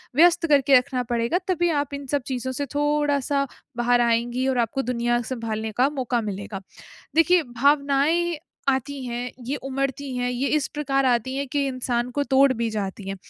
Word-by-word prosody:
व्यस्त 340 +2 +5
करके 280 -2 +5
रखना 250 0 -1
पड़ेगा 235 +7 0
तभी 350 -2 +1
आप 290 -3 -1
इन 280 0 -5
सब 285 +1 0
चीज़ों 260 0 -3
से 285 +3 -3
थोड़ा-सा 290 -1 +1 0.3
बाहर 240 0 +3
आएँगी 240 +2 +1
और 260 -1 +1
आपको 235 +4 0
दुनिया 240 -1 0
सँभालने 220 -3 -3
का 265 - +5
मौका 255 -4 -1
मिलेगा। 205 -1 -5 0.5
देखिए 330 +2 +5
भावनाएँ 285 +6 +2 0.3
आती 275 +1 -2
हैं, 245 +1 -4
ये 270 +4 -2
उमड़ती 275 0 -3
हैं, 245 0 -1
ये 250 +3 -1
इस 305 -3 +1
प्रकार 275 -2 0
आती 250 +1 +1
हैं 280 +1 -1
कि 280 +2 0
इंसान 250 -2 -2
को 285 +2 0
तोड़ 270 -1 +4
भी 230 -1 -1
जाती 200 -2 -4
है। 195 - -3
265 Hz, 175 wpm, -24 LUFS, 240-285 Hz, 0.5 s, व्यस्त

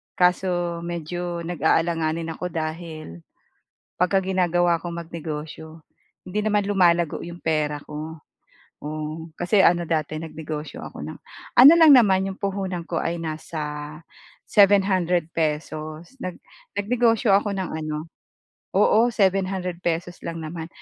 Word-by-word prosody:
kaso 180 -1 +1
medyo 170 +1 -4
nag-aalanganin 165 0 0
ako 180 +3 -4
dahil 155 - -5 0.8
pagka 180 +2 +2
ginagawa 175 -2 +2
ko 175 - -5
magnegosyo, 160 -1 -7 0.5
hindi 210 +3 -2
naman 210 -2 +1
lumalago 175 -5 +2
'yong 175 0 -9
pera 150 -2 0
ko. 155 +2 -8 0.6
Oh, 155 +2 -5
kasi 190 +2 +4
ano 170 -1 +3
dati 155 -1 -1
nagnegosyo 155 -1 -6
ako - - -9
ng - - -6 0.4
ano 265 +5 +10
lang 310 -4 +9
naman 195 -5 +4
'yong 190 - -6
puhunan 190 -3 -3
ko 165 0 -2
ay 170 - -1
nasa 155 -2 -5 0.5
₱700 190 -4 +3
pesos, 155 +2 -3
nag 185 -1 -5 0.4
nagnegosyo 225 0 +2
ako 200 0 +2
ng 190 - -3
ano 155 -1 -4 0.7
oo, 220 +3 +5
₱700 190 -3 0
pesos 175 +1 -2
lang 165 - -4
naman. 160 +1 -6
170 Hz, 120 wpm, -24 LUFS, 160-190 Hz, 0.8 s, ano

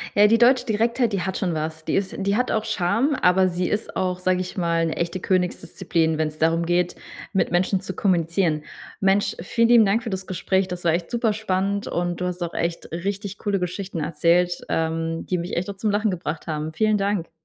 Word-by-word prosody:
Ja, 205 +1 +7
die 230 +2 +4
deutsche 245 +1 +4
Direktheit, 230 +1 +1
die 195 - 0
hat 190 +2 -2
schon 180 -4 -1
was. 155 0 -4
Die - - 0
ist 195 -1 -1
die 200 +1 +1
hat 250 +2 +1
auch 220 0 0
Charme, 220 - +1
aber 185 +1 +4
sie 180 0 -1
ist 210 - -3
auch- 180 -1 -1
sage 185 0 +1
ich 185 - -7
mal- 170 -2 +1
'ne 160 - -3
echte 170 +2 -2
Königsdisziplin, 180 -3 0
wenn's 155 -1 -2
darum 165 +1 +2
geht, 175 +1 +1 0.4
mit 195 - +1
Menschen 185 +2 +2
zu 190 0 -6
kommunizieren. 170 -4 +1 0.4
Mensch, 195 +2 +2
vielen 230 +6 +1
lieben 235 -3 +7
Dank 220 +4 +1
für 230 - -4
das 190 -1 -4
Gespräch. 190 +1 0
Das 180 -1 -6
war 170 - +3
echt 170 +1 -1
super 230 -2 +1
spannend, 200 -1 -1
und 175 0 -2
du 180 - -1
hast 180 0 -3
auch 170 - -4
echt 170 0 -3
richtig 200 +4 -4
coole 205 -2 -1
Geschichten 180 -1 -4
erzählt, 170 +3 +2
ähm, 165 0 -1
die 180 - 0
mich 175 +1 -4
echt 180 +3 -2
auch 200 - -6
zum 210 +1 0
Lachen 210 0 +1
gebracht 165 -3 -4
haben. 155 0 -3
Vielen 215 +4 +2
Dank. 195 -4 -1
185 Hz, 215 wpm, -23 LUFS, 170-205 Hz, 0.4 s, Ja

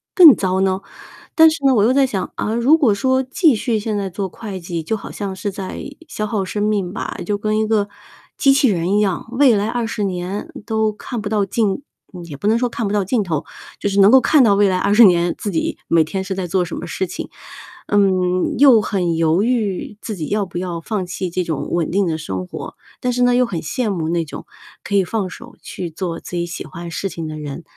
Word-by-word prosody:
更 330 -7 +10
糟 190 0 0
呢？ 190 -1 +1 0.6
但 320 -1 +8
是 285 -3 -4
呢， 265 -1 +5
我 205 - +4
又 245 - +4
在 270 -1 +4
想， 195 -6 -3
嗯， 220 +2 -1
如 280 +7 +5
果 265 -10 +3
说 260 +5 +1
继 290 +3 +3
续 225 +1 -1
现 215 0 -2
在 195 -1 -2
做 190 +1 -4
会 200 -1 -7
计， 170 -1 -4
就 220 - -1
好 200 - -9
像 195 -2 -5
是 200 +1 -3
在 190 -1 -6 0.3
消 215 - -4
耗 210 -2 -2
生 205 +2 -3
命 205 -4 0
吧， - - -5
就 205 -1 -1
跟 215 +1 0
一 220 - 0
个 210 -2 +1 0.5
机 275 -1 +4
器 270 -3 +4
人 175 0 0
一 - - +3
样， 195 -1 -1
未 255 -1 +5
来 205 +1 0
20 230 -3 -2
年， 185 +1 -4 0.2
都 220 -1 +1
看 230 +2 -6
不 205 - -5
到 210 -2 +1
尽 210 +4 -1 0.3
嗯， 180 -2 -8
也 150 -4 -8
不 200 - -3
能 220 +2 +4
说 245 +1 0
看 230 -2 -3
不 200 - -2
到 205 -1 +2
尽 220 +5 0
头， 160 -6 -2 0.4
就 205 - -1
是 200 0 0
能 195 +1 +7
够 265 - +7
看 280 +4 +4
到 205 -4 +4
未 205 0 +4
来 185 - +1
20 205 +5 +5
年 175 -3 +4
自 205 - -4
己 165 - -1
每 165 -1 +4
天 190 +5 -4
是 190 0 -4
在 190 -1 -3
做 180 +1 +1
什 170 - -6
么 175 - -6
事 190 - -2
情。 - - -6 0.6
嗯， 185 -3 +2
又 260 -6 +7
很 180 -5 -1
犹 165 +3 +2
豫 215 -4 -1
自 215 - -5
己 155 -3 -4
要 205 -1 0
不 175 - -8
要 175 -2 -4
放 200 0 -3
弃 180 +1 -4
这 180 +1 -1
种 160 -5 -3
稳 170 -2 0
定 195 +2 +1
的 160 -2 -1
生 95 -11 -4
活。 - - -8 0.2
但 250 -1 -1
是 250 - -1
呢， 245 0 +4
又 250 0 +4
很 175 -8 -4
羡 230 - -2
慕 165 -4 -2
那 170 -1 0
种， 145 - -9 0.4
可 - - -6
以 195 - +3
放 200 -1 -2
手 - - -12
去 175 - -6
做 165 +1 -4
自 - - -11
己 170 0 -1
喜 175 - -6
欢 170 0 -8
事 195 - -3
情 165 -3 -6
的 155 0 -6
人， 150 +2 -7
200 Hz, 260 characters per minute, -19 LUFS, 175-220 Hz, 0.6 s, 更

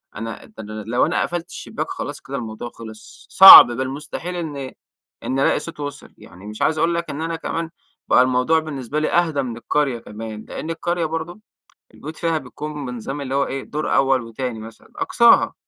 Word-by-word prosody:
أنا 115 +1 -7
ده 110 - -12
أنا 105 - -10 0.2
لو 120 +2 +2
أنا 170 - 0
قفلت 175 0 -3
الشبّاك - - -6
خلاص - - -6
كده - - -6
الموضوع 115 0 -6
خلص، 110 -1 -13
صعب 190 0 +12
بل 130 +2 -3
مستحيل 150 +6 -6
إن 145 -6 -5 0.5
إن 130 - -2
ألاقي 140 - +2
صوت 160 +1 -9
وصل، 145 -1 -7
يعني 95 +4 -14
مش 105 0 -9
عايز 160 - +1
أقول 170 +2 +1
لَك 170 0 -3
إن 145 - -5
أنا 165 0 -3
كمان 165 0 -4 0.4
بقى - - +5
الموضوع 130 +5 +2
بالنسبة 150 -2 -4
لي 155 - -1
أهدى 165 -5 +1
مِن 120 -3 -5
القرية 135 0 -1
كمان، 110 0 -9
لأن 160 - -6
القرية 170 +1 -2
برضو 165 +5 -5 0.5
البيوت 155 +2 -9
فيها 165 -2 -1
بيكون 150 +1 -7
بنظام 125 +4 -6
اللي 135 -1 -4
هو 140 0 +1
إيه، 135 0 -5
دور 150 +1 -2
أوّل 135 -1 +2
وتاني 115 +1 -5
مثلًا 110 +1 -13
أقصاها. 365 -12 +4
140 Hz, 190 wpm, -21 LUFS, 120-165 Hz, 0.5 s, صعب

